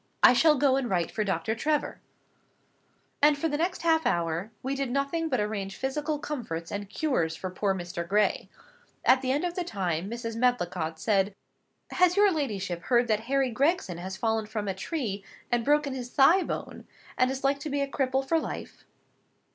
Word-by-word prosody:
I - - +9
shall 300 +5 +5
go 270 -1 +3
and 260 -3 -1
write 175 -3 0
for 215 - -1
Dr. 190 +1 -1
Trevor." 300 +6 -1 1.2
And 295 0 +5
for 325 - 0
the 295 - -2
next 345 +4 -1
half 320 -1 +3
hour, 170 +3 -1
we 265 +2 -1
did 275 -2 -2
nothing 280 +5 -1
but 255 - +1
arrange 205 -2 -3
physical 295 +3 -2
comforts 220 - -5
and 200 -1 -4
cures 200 - 0
for 185 +2 -5
poor 195 +1 0
Mr. 175 -1 -5
Gray. 210 +2 +1 0.6
At 260 +1 +5
the 260 -1 0
end 285 +4 0
of 350 - -2
the 360 - -2
time, 185 - -2
Mrs. 230 -1 -5
Medlicott 180 -10 0
said— 200 -1 +1 0.6
"Has 365 +1 +3
your 410 -1 +6
ladyship 200 - -2
heard 240 -1 +3
that 215 -1 +3
Harry 270 -2 +2
Gregson 270 - 0
has 190 +2 -6
fallen 220 +1 0
from 215 -1 -4
a 195 - 0
tree, 205 - -4 0.3
and 240 -1 +2
broken 290 +1 +2
his 250 -2 -5
thigh 305 +9 +5
bone, - - -5 0.3
and 255 - +3
is 265 +1 -4
like 275 +1 +2
to 300 +1 -5
be 285 0 -1
a 280 - 0
cripple 270 -1 -1
for 325 +2 +3
life?" - - -7
245 Hz, 190 wpm, -28 LUFS, 195-290 Hz, 1.2 s, I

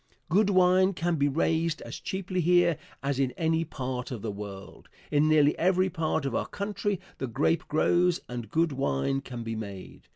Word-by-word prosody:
Good 200 +4 +3
wine 185 0 +4
can 170 -1 -1
be 140 0 +2
raised 165 +2 0
as - - -7
cheaply 190 -1 -3
here 175 -1 +3 0.2
as 140 -1 -1
in 135 -2 +2
any 160 0 +1
part 130 -5 -4
of 120 -6 -6
the 110 - -2
world. 100 -1 -9 0.2
In 150 +1 +3
nearly 150 -1 +4
every 185 +1 +2
part 160 -2 -1
of 135 - -2
our - - -1
country 205 -1 -2 0.2
the 130 - -2
grape 150 +7 0
grows 175 +3 +2
and 120 -3 -6
good 165 +5 +1
wine 135 - 0
can 120 -3 -7
be 115 0 -4
made. 100 -4 -8
155 Hz, 185 wpm, -28 LUFS, 125-180 Hz, 0.2 s, wine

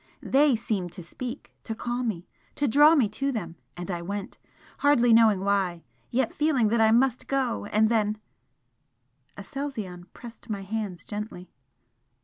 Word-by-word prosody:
THEY 280 -1 +4
seemed 205 -6 -3
to 180 - -8
speak! 250 - -7
to 225 - -4
call 240 +2 -3
me 205 -8 -3 0.3
to 285 - 0
draw 295 +6 +6
me 260 -8 +4
to 275 +6 -2
them 175 -9 -5 0.2
and 175 +2 -5
I 175 -1 -3
went 200 +3 -6 0.4
hardly 245 -5 +4
knowing 220 -4 +5
why, 195 -4 0 0.3
yet 250 -1 0
feeling 290 -8 +2
that 230 +1 +2
I 220 - +5
MUST 250 +2 +2
go! 265 -6 -1
and 215 +1 +3
then 215 -2 +1 0.6
" 125 0 -39
Aselzion 205 -6 -6
pressed 235 -2 -12
my 200 -2 -3
hands 200 -3 -4
gently. 210 -3 -7
220 Hz, 155 wpm, -26 LUFS, 190-250 Hz, 0.6 s, draw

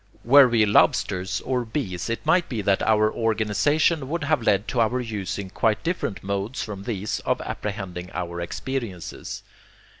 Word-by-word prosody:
Were 135 +2 +8
we 115 -3 +3
lobsters, 95 -2 +2
or 125 -1 -1
bees, 110 - -4
it 115 - -3
might 170 +3 +3
be 110 -5 -3
that 95 0 +2
our 110 -1 +3
organization 120 - +1
would 170 +2 -2
have 155 -5 +1
led 105 -1 +2
to 120 - +1
our 120 +3 +1
using 100 -4 -4
quite 110 +2 +1
different 170 - -2
modes 100 +6 -2
from 100 -3 -6
these 105 -3 -2
of - - -1
apprehending 95 -4 -5
our 85 -1 -4
experiences. 105 -1 -5
110 Hz, 155 wpm, -24 LUFS, 100-125 Hz, -, Were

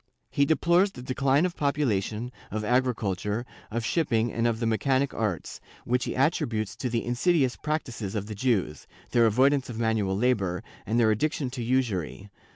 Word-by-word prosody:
He 140 - +3
deplores 170 +5 +3
the 125 - -10
decline 135 +4 +2
of 180 - -2
population, 120 -5 -1 0.2
of 110 0 -3
agriculture, 110 -3 0 0.2
of 115 +1 -3
shipping 120 -7 +1
and 115 0 +1
of 115 -1 0
the 120 - -1
mechanic 130 +5 +1
arts, 105 -8 -3 0.2
which 125 +1 +1
he - - -3
attributes 115 - 0
to 125 - -2
the 115 -1 -1
insidious 130 +2 +2
practices 120 -9 -3
of 100 -2 -2
the 110 - -6
Jews, 100 - -1 0.2
their 115 -1 +5
avoidance 130 +5 +3
of 115 - -6
manual 110 -4 0
labor 100 -7 +1 0.2
and 115 +4 +1
their 110 -2 +4
addiction 135 +3 -1
to 130 -1 -5
usury. 110 - -1
120 Hz, 165 wpm, -27 LUFS, 110-130 Hz, 0.2 s, their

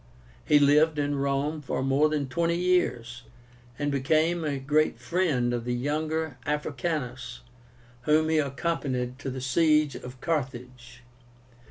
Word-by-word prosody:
He 150 - +4
lived 150 +2 +4
in 145 -1 -1
Rome 140 +3 -1
for 130 -1 -3
more 135 +3 +3
than 150 -3 -1
twenty 170 +5 0
years, 130 -10 0 0.6
and 145 0 -1
became 155 +5 +1
a 145 -2 -1
great 150 +3 +1
friend 150 -10 0
of 120 -1 -2
the 120 +1 -2
younger 155 +2 -2
Africánus, 145 -4 -3 0.6
whom 155 +1 +3
he 160 -1 +3
accompanied 135 -3 -2
to 140 - -4
the 130 0 -5
siege 150 +3 +3
of 125 0 -9
Carthage. 125 -5 -4
145 Hz, 135 wpm, -27 LUFS, 130-155 Hz, 0.6 s, He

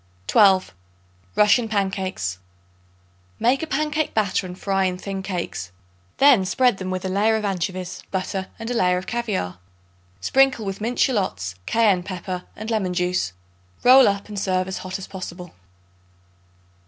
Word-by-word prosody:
12. 190 - +4 0.6
Russian 215 +2 +4
Pancakes. 190 - -2 1.0
Make 255 +3 +2
a 320 - -3
pancake 305 +1 -1
batter 200 -3 +1
and 180 0 -9
fry 195 -1 0
in 180 -1 -1
thin 195 +1 -5
cakes. 175 - -4 0.5
Then 275 -8 +6
spread 245 +4 +2
them 185 -1 -5
with 185 0 -3
a - - 0
layer 205 +4 +2
of 215 -1 -1
anchovies, 185 -1 -3
butter 190 0 -3
and 225 +1 -5
a - - 0
layer 180 -5 +2
of 185 - -5
caviare. 210 - -3 0.6
Sprinkle 260 - +3
with 195 +1 -4
minced 235 +3 +1
shallots, 100 - -1
cayenne 210 -5 +3
pepper 180 0 -5
and 220 +2 -6
lemon 190 -5 0
juice. 180 - 0 0.5
Roll 260 +1 +8
up 200 0 -1
and 205 -1 -5
serve 185 -1 -1
hot 185 0 -5
as 195 - -8
possible. 180 -2 -8
195 Hz, 150 wpm, -23 LUFS, 185-220 Hz, 1.0 s, Roll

